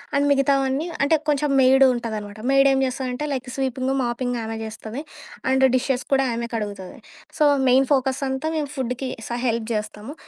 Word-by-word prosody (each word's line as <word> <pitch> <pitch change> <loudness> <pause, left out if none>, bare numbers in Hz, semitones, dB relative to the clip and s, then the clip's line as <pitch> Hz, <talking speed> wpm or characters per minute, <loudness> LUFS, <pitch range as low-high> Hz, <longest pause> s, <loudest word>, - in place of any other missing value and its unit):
And 285 +1 +2
మిగతావన్నీ 275 +2 +1 0.2
అంటే 320 - +4 0.2
కొంచెం 290 0 0
మెయిడుంటాదనమాట. 235 -6 +2
మెయిడేం 275 0 +5
చేస్తదంటే 255 +2 -3
లైక్ 255 -1 -4
స్వీపింగు, 265 0 -1
మాపింగు 240 +1 -3 0.2
ఆమె 225 - -4
చేస్తది. 220 +3 -7 0.5
అండ్ 265 0 +3
డిషెస్ 255 0 0
కూడా 270 0 +4
ఆమె 235 0 -3
కడుగుతాది. 205 -4 -5 0.4
సో, 305 - +3 0.2
మెయిన్ 260 +2 +5
ఫోకస్ 265 0 +1
అంతా 265 +4 -2
మేము 290 -2 -2
ఫుడ్‌కి 255 0 -3 0.2
స - - -10 0.2
హెల్ప్ 230 -1 -1
జేస్తాము. 210 +4 -5
260 Hz, 150 wpm, -23 LUFS, 235-270 Hz, 0.5 s, మెయిడేం